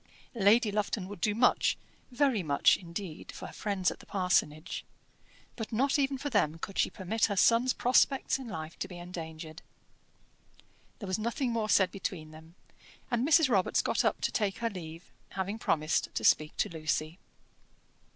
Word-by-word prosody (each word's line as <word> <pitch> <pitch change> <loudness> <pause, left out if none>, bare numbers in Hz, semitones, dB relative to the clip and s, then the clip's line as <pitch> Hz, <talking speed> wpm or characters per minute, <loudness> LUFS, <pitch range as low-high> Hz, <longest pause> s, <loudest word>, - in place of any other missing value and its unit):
Lady 220 0 +4
Lufton 205 -2 -2
would 200 -3 -9
do 210 -1 +1
much, 245 +2 +3 0.3
very 255 -4 +1
much, 145 -4 +4
indeed, 170 -1 -7
for - - -9
her - - -9
friends 195 -3 -1
at - - -10
the - - -16
parsonage; 180 -5 0 0.7
but 225 -1 -6
not 265 +5 +2
even 275 -1 +1
for 285 +2 -4
them 165 -8 +1
could 195 +4 -6
she - - +3
permit 215 +4 0
her 205 - -2
son's 235 +6 +4
prospects 260 +2 +2
in 260 - -8
life 160 -5 -7
to - - -3
be 180 - -10
endangered. 160 -2 -8 1.4
There 205 - -7
was 185 +3 -1
nothing 235 +3 -1
more 225 -2 -1
said 190 -3 +4
between 175 -5 -5
them, 160 +2 -14 0.6
and 240 +2 +1
Mrs. 320 -1 +5
Robarts 200 -7 +2
got - - +1
up - - 0
to - - 0
take 205 -4 -1
her 230 -1 -2
leave, 165 -2 -9 0.2
having 195 +3 -3
promised 155 -6 0
to - - -2
speak 155 0 +3
to - - +1
Lucy. 155 +1 -2
195 Hz, 170 wpm, -30 LUFS, 165-230 Hz, 1.4 s, Mrs